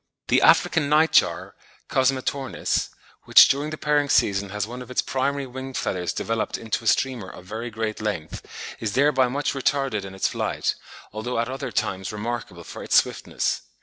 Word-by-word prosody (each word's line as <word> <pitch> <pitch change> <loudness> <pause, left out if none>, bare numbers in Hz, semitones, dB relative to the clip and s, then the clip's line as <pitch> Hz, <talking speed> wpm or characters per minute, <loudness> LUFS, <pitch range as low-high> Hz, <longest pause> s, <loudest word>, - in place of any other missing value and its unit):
The - - +4
African 150 -3 +4
night 155 +2 +4
jar - - +2 0.3
(Cosmetornis), 130 0 0 0.4
which - - +8
during 145 +2 0
the 155 - -5
pairing 145 -1 +1
season 100 -4 +2
has 105 0 -2
one 125 +3 -8
of 125 - -10
its 125 - 0
primary 140 +1 -1
wing 130 +1 -7
feathers 90 -2 -2
developed 115 0 -2
into 115 0 -3
a - - -2
streamer 125 -8 +1
of 90 - -12
very 110 +5 -5
great 110 -1 -4
length, 90 -8 -4 0.4
is 110 -3 -3
thereby 135 -1 +3
much 140 +4 -1
retarded 135 -5 0
in 95 0 -8
its 95 - +1
flight, - - -1 0.4
although 110 +3 -3
at 115 +1 0
other 130 -1 -5
times 95 -2 -2
remarkable 105 -5 -5
for - - -9
its - - -1
swiftness. - - +1
120 Hz, 175 wpm, -24 LUFS, 105-135 Hz, 0.4 s, which